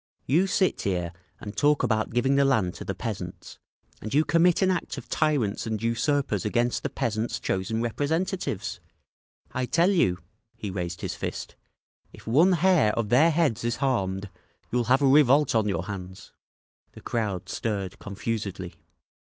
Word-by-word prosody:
"You 170 +9 +3
sit 185 0 +1
here 90 -3 -2 0.3
and 105 0 -8
talk 145 +5 +3
about 110 -1 +1
giving 120 +3 +1
the 140 0 +4
land 110 -10 +2
to - - -8
the - - -4
peasants, - - -6 0.4
and 110 - -6
you 150 +3 +3
commit 170 +2 +3
an 190 - +3
act 180 - -3
of - - -8
tyrants 135 -11 0
and 110 -1 -2
usurpers 115 0 0
against 120 +3 0
the - - -2
peasants' 110 +1 -2
chosen 110 +5 -1
representatives! 160 - -2 0.7
I 130 0 -2
tell 170 +7 +3
you—" 95 - +2 0.4
he 105 - -5
raised 90 -2 -4
his - - -3
fist, - - -5 0.6
"If - - -15
one 160 +11 +4
hair 170 - +3
of 110 -3 -1
their 150 +8 +5
heads 155 -9 +1
is 120 0 0
harmed, 100 -8 -1 0.4
you'll 120 0 +1
have 130 +4 +3
a - - +5
revolt 140 +1 +5
on 110 -2 +2
your 95 -3 -1
hands!" 95 -2 -8 0.6
The - - -12
crowd 105 -6 -2
stirred 100 -4 -3
confusedly. 100 -3 -5
115 Hz, 160 wpm, -26 LUFS, 100-145 Hz, 0.7 s, their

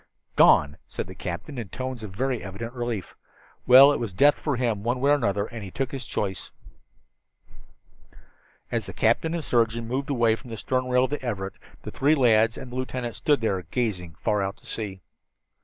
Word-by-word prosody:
"Gone," 75 0 +5
said - - -5
the 95 - -10
captain 95 - -6
in 110 -5 -6
tones 130 -2 -5
of 110 - -6
very 125 +6 -2
evident 100 +5 -6
relief. 120 -7 -4 0.5
"Well, 135 +3 +9
it - - -2
was 115 -5 -4
death 145 +9 +4
for 150 -3 -1
him, 120 -5 -1
one 120 +4 -1
way 140 +2 +3
or - - +7
another, 100 -8 +1
and 115 -1 -8
he 95 - -7
took 130 +6 -3
his 135 -2 -6
choice." 95 -3 -3 2.2
As 115 -3 -1
the 95 - -7
captain 140 +9 +1
and 165 - -3
surgeon 115 -2 +1
moved 135 +4 -3
away 120 -5 +3
from 125 +2 -13
the 115 - -6
stern 130 +3 -1
rail 125 0 +3
of 130 - -1
the 145 - -3
Everett, 95 -6 -3 0.3
the - - -6
three 145 +3 +3
lads 115 -3 +4
and 130 -2 -8
the - - -7
lieutenant 125 -2 -4
still 150 -2 +3
stood 140 - -12
there, 100 -4 0
gazing 90 -9 -2
far 105 +5 0
out 100 +1 -3
to - - -21
sea. 100 -4 -5
115 Hz, 205 wpm, -25 LUFS, 100-130 Hz, 2.2 s, Well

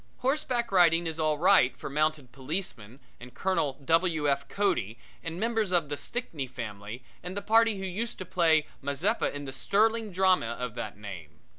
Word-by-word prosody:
Horseback 255 -4 0
riding 170 -2 +5
is 165 -1 -3
all 155 -1 +1
right 125 -3 +4
for - - -7
mounted 150 -2 -1
policemen 130 - -5 0.2
and 125 0 -12
Colonel 170 -7 0
W. 165 -1 +2
F. 140 -1 0
Cody 120 - 0 0.3
and 165 +1 -5
members 225 -3 0
of 170 -5 +2
the 145 - -2
Stickney 165 - -4
family 115 -2 -7 0.2
and 180 +3 -6
the - - -1
party 225 0 +4
who 190 - -4
used 220 +6 -4
to 185 - -6
play 160 -4 +3 0.2
Mazeppa 140 - 0
in 145 0 -6
the 135 - -6
sterling 220 +8 +1
drama 185 -10 +2
of 125 -2 -3
that 105 -2 -6
name. 85 -6 -10
160 Hz, 175 wpm, -28 LUFS, 130-195 Hz, 0.3 s, riding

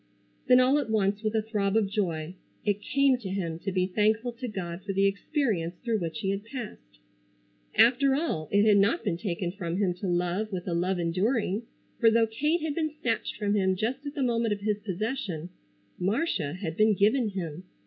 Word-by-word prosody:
Then, 250 - +7
all 260 +3 +4
at 265 -6 -3
once, 205 -1 +1
with 215 0 -1
a 220 - +2
throb 210 -2 0
of 215 -3 +2
joy, 175 -5 -2 0.3
it 205 -1 +1
came 275 0 +2
to 205 -6 -6
him 170 -4 -3
to 195 - -3
be 185 -1 +1
thankful 215 +5 +1
to 240 +2 -6
God 180 -4 -5
for 200 - -3
the 195 +1 +3
experience 195 - 0
through 230 -3 -1
which 170 +4 -4
he 195 -2 0
had 200 +1 -3
passed. 225 - -8 0.8
After 265 +3 +5
all 215 - -2
it 205 +1 +4
had 210 -2 +6
not 205 - +2
been 185 -6 -1
taken 175 -2 -3
from 175 -3 -4
him 195 -3 +1
to 185 +2 -5
love 180 +4 0
with 180 -1 -4
a 175 - -1
love 180 +2 0
enduring, 200 +5 0 0.3
for 230 - +6
though 225 0 +4
Kate 300 +10 0
had 310 -1 -2
been 315 0 0
snatched 235 -6 -1
from 205 -1 -1
him 190 -2 +2
just 240 +8 -2
at 285 0 -6
the 280 - 0
moment 230 -3 +1
of 200 - -6
his 210 0 0
possession, 195 - -3 0.5
Marcia 190 - 0
had 175 -4 -5
been 215 +1 +4
given 215 +4 +3
him. 180 -3 -5
205 Hz, 205 wpm, -28 LUFS, 185-230 Hz, 0.8 s, Then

